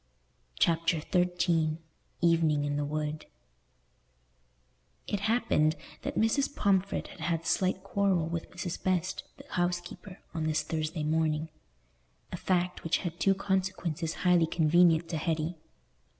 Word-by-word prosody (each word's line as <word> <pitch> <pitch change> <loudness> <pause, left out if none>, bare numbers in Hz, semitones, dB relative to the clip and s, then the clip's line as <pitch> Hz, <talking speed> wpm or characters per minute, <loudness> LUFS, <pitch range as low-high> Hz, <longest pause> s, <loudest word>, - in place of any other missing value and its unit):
Chapter 165 -1 +2
XIII 175 -2 +1 0.4
Evening 165 -4 +3
in 145 0 -1
the 145 - 0
Wood 150 +1 -3 1.8
It 205 - -2
happened 200 -8 +2 0.3
that - - -4
Mrs. 275 +6 +1
Pomfret 195 -1 +1
had - - -13
had 165 -2 -1
a - - -19
slight 185 0 +1
quarrel 195 -4 +1
with 165 0 -4
Mrs. 175 -1 -5
Best, 185 0 0
the - - -12
housekeeper, 175 +2 -2 0.2
on 160 -2 -2
this 155 0 +1
Thursday 155 0 -3
morning—a 150 - -4
fact 180 0 0
which 165 - +2
had 170 0 -4
two 195 0 +3
consequences 190 -4 -1
highly 175 -2 +5
convenient 165 +1 +4
to 165 - -2
Hetty. 160 +1 -2
170 Hz, 125 wpm, -30 LUFS, 155-180 Hz, 1.8 s, highly